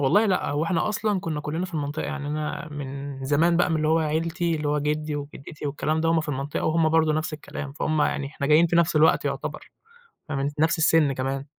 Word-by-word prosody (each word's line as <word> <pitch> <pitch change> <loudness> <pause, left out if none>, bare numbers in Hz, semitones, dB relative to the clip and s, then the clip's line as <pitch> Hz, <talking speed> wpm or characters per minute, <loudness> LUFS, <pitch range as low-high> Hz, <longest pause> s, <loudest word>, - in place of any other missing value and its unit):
والله 205 +11 +4
لأ، 185 -6 +1
هو 145 +2 0
إحنا 170 +4 0
أصلًا 210 -2 0
كنا 155 -3 -3
كُلّنا 160 +5 -3
في 175 - -11
المنطقة، 145 0 -2
يعني 150 -2 -4
أنا 150 +1 -3
من 140 -1 -6
زمان 160 +5 +3
بَقى 175 0 +2
من 160 - +2
اللي 155 0 0
هو 160 +1 +4
عيلتي، 165 +2 0
اللي 150 -1 -2
هو 150 0 +1
جدي 150 +1 -1
وجدتي 145 +1 -7
والكلام 155 +2 -1
ده 165 - +1
وهم 165 0 +3
في 155 - -7
المنطقة 140 +1 -3
وهم 160 0 +3
برضه 160 -1 +3
نَفْس 155 +1 -2
الكلام، 145 -2 -7
فهم 155 +1 0
يعني 140 - 0
إحنا 140 -1 -4
جايين 155 +3 +5
في 170 - +1
نَفْس 165 -2 +3
الوقت 155 +1 +4
يُعتَبَر، - - -4 0.6
فاهماني؟ 140 0 -1
نَفْس 165 +3 +3
السن 160 -3 +4
كمان. 135 +1 -3
155 Hz, 225 wpm, -25 LUFS, 145-165 Hz, 0.6 s, جايين